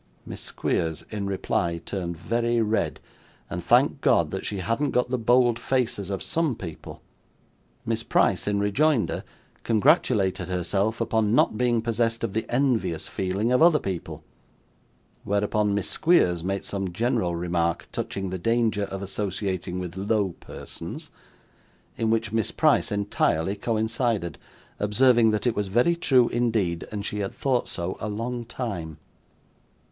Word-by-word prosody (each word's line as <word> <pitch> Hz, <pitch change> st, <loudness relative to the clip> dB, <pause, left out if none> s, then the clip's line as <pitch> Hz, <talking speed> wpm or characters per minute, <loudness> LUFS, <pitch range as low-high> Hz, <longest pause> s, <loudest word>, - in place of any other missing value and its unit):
Miss -, -, -7 dB
Squeers, 80 Hz, -1 st, -2 dB
in 100 Hz, -2 st, -3 dB
reply, 85 Hz, -3 st, -1 dB
turned 85 Hz, 0 st, -5 dB
very 120 Hz, +7 st, 0 dB
red, 110 Hz, 0 st, 0 dB, 0.5 s
and -, -, -4 dB
thanked -, -, +3 dB
God -, -, +3 dB
that -, -, -4 dB
she 105 Hz, -, -3 dB
hadn't 115 Hz, +10 st, 0 dB
got 125 Hz, -1 st, 0 dB
the 130 Hz, -, +1 dB
bold 120 Hz, 0 st, +3 dB
faces 115 Hz, -7 st, -1 dB
of 95 Hz, -1 st, -3 dB
some 160 Hz, -6 st, 0 dB
people. 85 Hz, -7 st, -9 dB, 0.8 s
Miss -, -, -1 dB
Price, -, -, +1 dB
in 100 Hz, -1 st, +1 dB
rejoinder, 120 Hz, +5 st, +1 dB, 0.4 s
congratulated 110 Hz, -, +2 dB
herself 95 Hz, +5 st, -1 dB
upon 110 Hz, -1 st, +1 dB
not -, -, +3 dB
being 120 Hz, -1 st, +1 dB
possessed 115 Hz, 0 st, 0 dB
of 95 Hz, -, -2 dB
the 110 Hz, -, -2 dB
envious 120 Hz, -, 0 dB
feeling 95 Hz, +5 st, -1 dB
of 125 Hz, -, +3 dB
other 165 Hz, -2 st, +7 dB
people; 95 Hz, -, -5 dB, 1.0 s
whereupon 105 Hz, 0 st, +1 dB
Miss 100 Hz, -, -1 dB
Squeers 90 Hz, -, +3 dB
made 95 Hz, +2 st, -2 dB
some 95 Hz, -2 st, -3 dB
general 110 Hz, -3 st, 0 dB
remark 85 Hz, -1 st, -1 dB
touching 95 Hz, -2 st, -4 dB
the 95 Hz, -, -3 dB
danger 115 Hz, 0 st, +1 dB
of 95 Hz, 0 st, -6 dB
associating 95 Hz, -2 st, -3 dB
with 90 Hz, -1 st, -5 dB
low 100 Hz, +1 st, +1 dB
persons; -, -, -8 dB, 0.8 s
in 115 Hz, -, 0 dB
which 115 Hz, -1 st, 0 dB
Miss 110 Hz, -2 st, 0 dB
Price -, -, +2 dB
entirely 100 Hz, -3 st, 0 dB
coincided: 110 Hz, -, -1 dB, 0.4 s
observing 115 Hz, +2 st, +4 dB
that 105 Hz, +1 st, 0 dB
it 120 Hz, -2 st, +2 dB
was 105 Hz, -1 st, -1 dB
very 120 Hz, -, +3 dB
true 130 Hz, -7 st, +4 dB
indeed, 110 Hz, -8 st, 0 dB
and 100 Hz, -1 st, -4 dB
she 105 Hz, -, -3 dB
had 100 Hz, -1 st, -3 dB
thought 130 Hz, -3 st, 0 dB
so 85 Hz, +1 st, -4 dB
a 105 Hz, -, -3 dB
long 120 Hz, +3 st, -3 dB
time. 100 Hz, -, -5 dB
105 Hz, 145 wpm, -25 LUFS, 95-120 Hz, 1.0 s, other